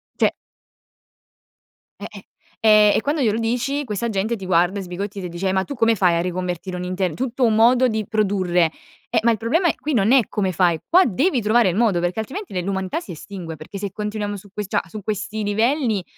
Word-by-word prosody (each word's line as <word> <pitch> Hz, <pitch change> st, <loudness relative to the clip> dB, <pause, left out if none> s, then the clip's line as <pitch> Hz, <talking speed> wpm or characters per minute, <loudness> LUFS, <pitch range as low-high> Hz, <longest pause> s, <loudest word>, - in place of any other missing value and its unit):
Cioè! -, -, +2 dB, 1.7 s
Eh-eh. -, -, -9 dB, 0.3 s
Ehm, 215 Hz, -2 st, +6 dB
e -, -, +2 dB
quando 290 Hz, +3 st, -1 dB
glielo 220 Hz, -2 st, +1 dB
dici 250 Hz, +5 st, -1 dB
questa 230 Hz, 0 st, -3 dB
gente 215 Hz, +3 st, -1 dB
ti 195 Hz, -3 st, -8 dB
guarda 180 Hz, +2 st, +2 dB
sbigottita 195 Hz, +3 st, -5 dB
e -, -, -5 dB
ti 170 Hz, -, -11 dB
dice: 190 Hz, +2 st, -2 dB
"Eh -, -, +1 dB
ma 190 Hz, 0 st, +1 dB
tu 280 Hz, -, -6 dB
come 230 Hz, -2 st, +3 dB
fai 180 Hz, -3 st, +3 dB
a 170 Hz, -, +1 dB
riconvertire 180 Hz, 0 st, -4 dB
un 180 Hz, -, -4 dB
inter 185 Hz, -1 st, -2 dB
tutto 255 Hz, +4 st, -2 dB
un 220 Hz, -2 st, +2 dB
modo 245 Hz, +3 st, +5 dB
di 220 Hz, -2 st, -2 dB
produrre?" 185 Hz, -6 st, +1 dB, 0.4 s
Eh, -, -, +2 dB
ma 235 Hz, -, +4 dB
il 220 Hz, -, 0 dB
problema 320 Hz, -, +1 dB
è -, -, +1 dB
qui 300 Hz, -1 st, -4 dB
non 220 Hz, 0 st, +3 dB
è 260 Hz, -6 st, +5 dB
come 195 Hz, -3 st, -1 dB
fai, 170 Hz, -2 st, +2 dB
qua 365 Hz, +3 st, +5 dB
devi 265 Hz, -, +1 dB
trovare 220 Hz, -1 st, +3 dB
il 175 Hz, -, -2 dB
modo 210 Hz, -5 st, +2 dB
perché 175 Hz, +5 st, -1 dB
altrimenti 265 Hz, -, -5 dB
l'umanità 190 Hz, -, -2 dB
si 345 Hz, -, -10 dB
estingue, 170 Hz, -1 st, -8 dB
perché 155 Hz, +6 st, -9 dB
se 200 Hz, 0 st, -4 dB
continuiamo 210 Hz, 0 st, -4 dB
su 200 Hz, +1 st, -14 dB
que 210 Hz, +1 st, -4 dB
cioè 195 Hz, -, 0 dB
su 215 Hz, +4 st, -7 dB
questi 210 Hz, +1 st, -3 dB
livelli, 225 Hz, 0 st, +1 dB
210 Hz, 215 wpm, -21 LUFS, 185-230 Hz, 1.7 s, Ehm